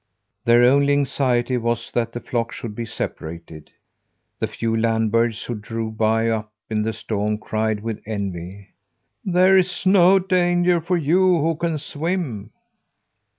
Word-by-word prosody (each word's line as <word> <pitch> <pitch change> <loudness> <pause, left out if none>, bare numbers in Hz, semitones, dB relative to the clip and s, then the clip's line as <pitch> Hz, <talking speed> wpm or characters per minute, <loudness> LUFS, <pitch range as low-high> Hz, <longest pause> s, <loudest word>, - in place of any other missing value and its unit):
Their 120 +1 +5
only 140 +3 +4
anxiety 130 -3 +1
was 115 0 -2
that 115 -1 -1
the 120 - -5
flock 120 -2 -3
should 115 -3 -6
be 115 +2 -5
separated. 80 -7 -7 0.7
The - - 0
few 115 -1 -2
land 110 -1 +1
birds 115 -1 +1
who 120 - -4
drove 110 0 -5
by, 110 +1 +1
up 110 -1 -2 0.2
in 105 -1 0
the 110 +1 -1
storm, 105 -1 -2
cried 110 0 -2
with 115 -1 -5
envy: 100 -2 -5 0.5
"There 185 0 +4
is 185 0 +1
no 190 0 +6
danger 175 -2 +2
for 175 +2 0
you 175 +3 +3
who 165 +2 +1
can 165 0 -2
swim." 145 - -3
115 Hz, 150 wpm, -22 LUFS, 110-165 Hz, 0.7 s, no